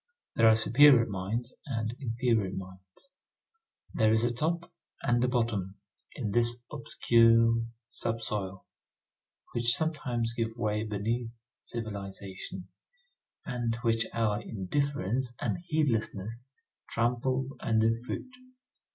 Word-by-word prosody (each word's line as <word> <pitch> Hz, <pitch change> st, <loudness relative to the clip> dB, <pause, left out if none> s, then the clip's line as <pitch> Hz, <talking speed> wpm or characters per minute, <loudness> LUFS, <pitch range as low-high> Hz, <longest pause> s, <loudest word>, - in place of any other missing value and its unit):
There 115 Hz, -, +5 dB
are 110 Hz, -, +7 dB
superior 120 Hz, +2 st, +6 dB
mines 110 Hz, +5 st, -3 dB
and 115 Hz, -3 st, -2 dB
inferior 115 Hz, -5 st, +1 dB
mines. 95 Hz, -, -10 dB, 0.8 s
There 110 Hz, -1 st, +3 dB
is 110 Hz, +1 st, +3 dB
a 120 Hz, 0 st, +1 dB
top 170 Hz, +7 st, -2 dB, 0.3 s
and 120 Hz, 0 st, +2 dB
a -, -, +3 dB
bottom 115 Hz, -6 st, -1 dB, 0.4 s
in 105 Hz, -, -3 dB
this 120 Hz, +2 st, +2 dB
obscure 115 Hz, -5 st, +4 dB, 0.3 s
sub 115 Hz, 0 st, -2 dB
soil, 95 Hz, -3 st, -2 dB, 0.9 s
which 120 Hz, 0 st, +5 dB
sometimes 125 Hz, -8 st, -1 dB
gives 115 Hz, 0 st, -3 dB
way 105 Hz, -2 st, 0 dB
beneath 110 Hz, +3 st, -2 dB, 0.3 s
civilization, 100 Hz, -4 st, -6 dB, 0.8 s
and 120 Hz, -2 st, -1 dB
which 115 Hz, -1 st, +2 dB
our 110 Hz, -2 st, 0 dB
indifference 120 Hz, +2 st, -2 dB
and -, -, -1 dB
heedlessness 120 Hz, -, -1 dB, 0.4 s
trample 130 Hz, +3 st, 0 dB
under 110 Hz, 0 st, +3 dB
foot. 115 Hz, +2 st, -5 dB
115 Hz, 110 wpm, -30 LUFS, 105-120 Hz, 0.9 s, are